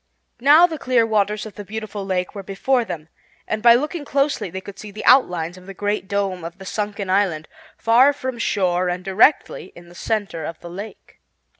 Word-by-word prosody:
Now 295 +7 +7
the 320 -3 -4
clear 250 -3 +2
waters 210 -1 0
of 215 - -9
the 205 - -8
beautiful 215 0 -6
lake 185 -2 -2
were 200 - -6
before 220 +7 0
them 160 -7 -7 0.4
and 215 - -2
by 235 0 +7
looking 300 +5 -2
closely 280 -7 0
they 190 +3 -6
could 195 0 -11
see 210 - -8
the 210 +2 -8
outlines 180 -9 +3
of 185 - -17
the 195 - -9
Great 205 0 -2
Dome 195 -3 -2
of 170 +2 -7
the 190 - -11
sunken 205 0 -3
island, 185 -5 0 0.3
far 245 +5 +5
from 260 -4 -5
shore 180 -5 0
and 180 +1 -4
directly 290 - +2
in 175 0 -14
the - - -15
center 200 -4 -3
of 165 +2 -6
the 170 - -10
lake. 200 +5 -10
205 Hz, 200 wpm, -21 LUFS, 185-235 Hz, 0.4 s, Now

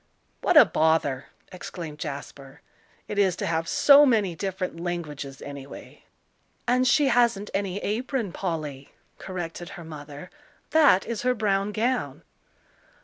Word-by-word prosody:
"What - - +3
a - - +10
bother," 155 -4 +1 0.2
exclaimed 170 -4 -8
Jasper, 140 -2 -8 0.5
"it 205 - -3
is 190 -3 +3
to - - -4
have 165 0 -1
so 285 0 +7
many 215 -9 +2
different 190 -2 -4
languages, 150 -6 -5
anyway!" 140 -1 -10 0.6
"And 255 +1 +3
she 280 +2 +4
hasn't 235 -5 +2
any 195 -1 -2
apron, 230 0 -2
Polly," 155 -7 -5 0.3
corrected 175 -2 -6
her 175 - -9
mother; 150 0 -10 0.4
"that 295 -12 +5
is 235 -2 -4
her 250 0 +1
brown 200 -2 0
gown." 240 +4 -2
185 Hz, 130 wpm, -25 LUFS, 155-220 Hz, 0.6 s, a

